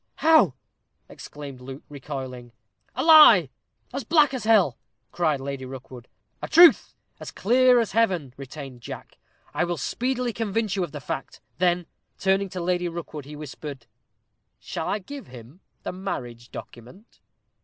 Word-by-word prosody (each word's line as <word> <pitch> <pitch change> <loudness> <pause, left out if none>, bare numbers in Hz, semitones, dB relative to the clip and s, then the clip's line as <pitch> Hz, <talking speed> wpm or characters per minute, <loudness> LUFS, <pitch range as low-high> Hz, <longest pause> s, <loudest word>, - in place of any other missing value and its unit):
"How?" 310 - +4 0.5
exclaimed 140 -3 -10
Luke, 135 +2 -9
recoiling. 130 -4 -7 0.4
"A 260 - -1
lie, 295 - +8 0.4
as 275 +1 -3
black 300 -4 +4
as 255 -4 -4
hell," 205 - +3 0.3
cried 155 -5 0
Lady 135 0 -5
Rookwood. 130 -2 -10 0.3
"A - - -4
truth, 340 +1 +6 0.2
as - - -7
clear 250 +3 +4
as 230 - -1
heaven," 185 - +1
retained 135 -2 -9
Jack. - - -10 0.3
"I - - +1
will 175 -1 -2
speedily 250 - -2
convince 220 -2 -1
you 190 - 0
of 175 - -5
the 145 - -7
fact." 135 - -6 0.2
Then, 175 -1 +2 0.3
turning 195 +1 +1
to 185 0 -6
Lady 175 0 0
Rookwood, 160 -4 -7
he 150 +1 -9
whispered, 145 -3 -8 0.7
"Shall 160 - -5
I 200 - 0
give 275 +7 -10
him 125 +6 -13 0.2
the - - -3
marriage 125 -11 -6
document?" 150 - -12
175 Hz, 145 wpm, -25 LUFS, 135-225 Hz, 0.7 s, lie